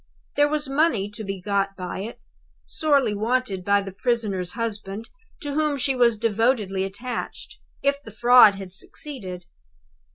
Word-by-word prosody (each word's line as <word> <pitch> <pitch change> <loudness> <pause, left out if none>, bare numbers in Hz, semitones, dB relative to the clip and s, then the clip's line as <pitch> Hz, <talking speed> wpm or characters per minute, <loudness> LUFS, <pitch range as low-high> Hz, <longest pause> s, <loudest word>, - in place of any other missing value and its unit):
There 290 0 +5
was 300 -1 -1
money 270 -8 +1
to 210 +1 -7
be 195 -1 -4
got 195 +1 0
by 180 0 -5
it 215 +5 -6 0.5
(sorely 285 -8 +2
wanted 215 -2 -1
by 200 +1 +3
the 195 - -6
prisoner's 200 -4 -1
husband, 215 -2 -4 0.4
to 290 -1 -3
whom 300 -1 +1
she 270 0 +1
was 235 -3 +4
devotedly 215 -3 +1
attached), 205 +6 -5 0.2
if 280 0 +1
the 225 - -11
fraud 240 -1 +7
had 190 -2 -8
succeeded. 190 -5 -7
220 Hz, 150 wpm, -24 LUFS, 195-255 Hz, 0.5 s, fraud